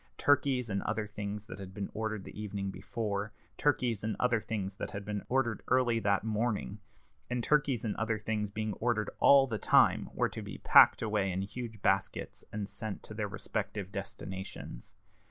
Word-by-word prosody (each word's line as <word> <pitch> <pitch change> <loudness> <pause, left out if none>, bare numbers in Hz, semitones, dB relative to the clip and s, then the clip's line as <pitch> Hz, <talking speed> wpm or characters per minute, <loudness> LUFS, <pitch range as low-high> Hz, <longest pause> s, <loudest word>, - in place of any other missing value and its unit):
Turkeys 135 -4 +3
and 100 -2 -1
other 110 +1 -1
things 105 0 -5
that 95 - -9
had 95 -1 -8
been 100 -1 -4
ordered 110 -2 -2
the 105 - -8
evening 100 -2 -3
before, 105 -1 -3 0.2
turkeys 125 -7 +1
and 110 0 -1
other 120 -3 +2
things 100 -3 -3
that - - -4
had 100 0 -6
been 105 -1 -3
ordered 125 -3 +1
early 120 -2 +3
that 100 -2 +2
morning, 110 -1 -1 0.5
and 125 -1 -1
turkeys 140 -5 +2
and 105 - -1
other 110 +1 0
things 105 0 -2
being 110 +1 -2
ordered 110 -3 0
all 140 -1 +7
the 115 -5 -3
time, - - +4
were - - +2
to - - -6
be - - -7
packed - - +7
away 105 -3 +1
in 95 +1 -1
huge 110 0 -7
baskets, 95 0 0
and 105 -1 -3
sent 110 0 -6
to - - -8
their 105 -1 -2
respective 100 -1 -4
destinations. 95 - -7
105 Hz, 180 wpm, -32 LUFS, 100-115 Hz, 0.5 s, all